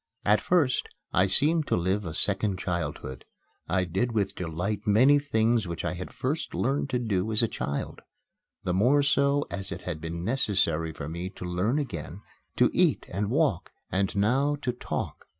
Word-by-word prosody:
At 105 0 +4
first 155 -9 +1 0.2
I 90 +2 +4
seemed 155 - +3
to - - +2
live 95 +3 0
a 80 - -5
second 100 0 +2
childhood. 75 -8 -4 0.5
I 90 +1 +2
did 95 +8 -1
with 100 -3 0
delight 90 +5 -3
many 130 +8 +6
things 115 -6 +1
which 85 -1 -4
I - - -1
had 90 +1 -7
first 145 +5 -3
learned 140 +2 0
to 130 - 0
do 110 -3 -1
as 110 +2 +3
a - - +3
child 70 -8 -4 0.6
the 90 - -1
more 125 +10 +4
so 140 0 +2
as 95 -1 -4
it - - -5
had 75 - -5
been 85 +2 -5
necessary 95 -9 +1
for 70 -2 -7
me 85 +3 -4
to 90 - -9
learn 90 +9 0
again 95 - -5 0.3
to - - +4
eat - - +2
and 100 +3 -2
walk, 135 - +1 0.2
and 95 +2 0
now 130 +9 +2
to 125 - +1
talk. 125 - -5
100 Hz, 180 wpm, -27 LUFS, 90-125 Hz, 0.6 s, many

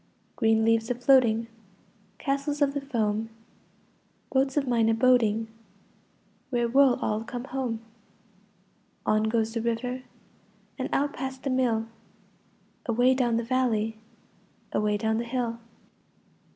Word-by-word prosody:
Green 220 -1 +3
leaves 225 0 +2
a 245 - 0
floating, 245 -3 +4 0.7
Castles 280 +1 -2
of 285 -2 +2
the 285 - -2
foam, 225 -5 -1 1.0
Boats 270 +1 +1
of 280 -2 +1
mine 230 -2 +3
a 225 - +3
boating— 225 -3 +3 1.0
Where 240 -2 +1
will 265 +1 +4
all 215 +1 -1
come 240 +1 -6
home? 255 -4 -3 1.2
On 215 0 +2
goes 225 0 0
the 230 - -1
river 245 +2 -2 0.8
And - - -2
out 285 +1 +1
past 265 0 -5
the 275 - -1
mill, 240 -4 +1 1.0
Away 245 +2 +4
down 240 -3 +1
the 235 - -1
valley, 230 -3 0 0.8
Away 210 0 +1
down 220 +1 0
the - - -1
hill. 235 -1 -2
235 Hz, 125 wpm, -27 LUFS, 225-260 Hz, 1.2 s, floating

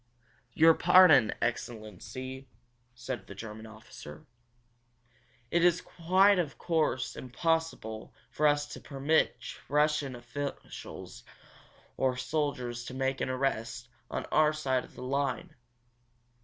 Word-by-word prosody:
"Your 165 +1 +7
pardon, 175 - +6
excellency," 120 +3 -5 0.5
said 120 -4 -6
the 100 - -9
German 110 +1 -8
officer. 110 -9 -12 1.3
"It 170 0 +3
is, 175 0 +3 0.3
of 185 -5 +4
course, 130 -8 0
quite - - -8
impossible 130 -5 -2 0.2
for 150 - +2
us 145 0 +2
to - - -8
permit 140 -1 +1 0.3
Russian 150 -2 +1
officials 120 +4 -7 0.7
or 130 -1 +1
soldiers 125 -3 -2
to 130 - -7
make 135 0 -1
an - - -1
arrest 125 -2 -2 0.2
on - - -3
our 155 0 +4
side 130 -4 0
of - - -16
the - - -8
line!" 140 +1 -2
130 Hz, 115 wpm, -30 LUFS, 120-155 Hz, 1.3 s, Your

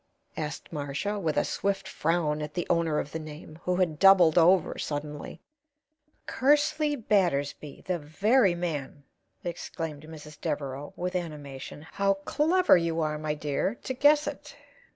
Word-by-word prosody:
asked 150 +1 -5
Marcia, 150 +8 -3
with 160 -5 -1
a - - +3
swift 195 0 -2
frown 155 -2 0
at 150 0 -6
the 175 - -1
owner 165 -3 +1
of 145 - -3
the 160 - -4
name, 155 +1 -10
who 180 - +1
had 170 -4 0
doubled 190 -5 +7
over 175 0 +4
suddenly. 150 0 -5 0.9
"Kersley 295 +2 +2
Battersby. 170 - 0
The 180 -2 -1
very 195 - +2
man!" 150 -5 -4 0.4
exclaimed 160 -3 -5
Mrs. 150 -1 -11
Devereaux, 145 -3 -3
with 180 +1 -3
animation. 150 -5 -6
"How 195 0 +2
clever 320 - +3
you 165 -2 0
are, 155 -1 -1
my 155 -1 -2
dear, 150 +8 -1
to 260 - -3
guess 290 +3 +4
it! 290 0 -7
165 Hz, 145 wpm, -28 LUFS, 150-195 Hz, 0.9 s, doubled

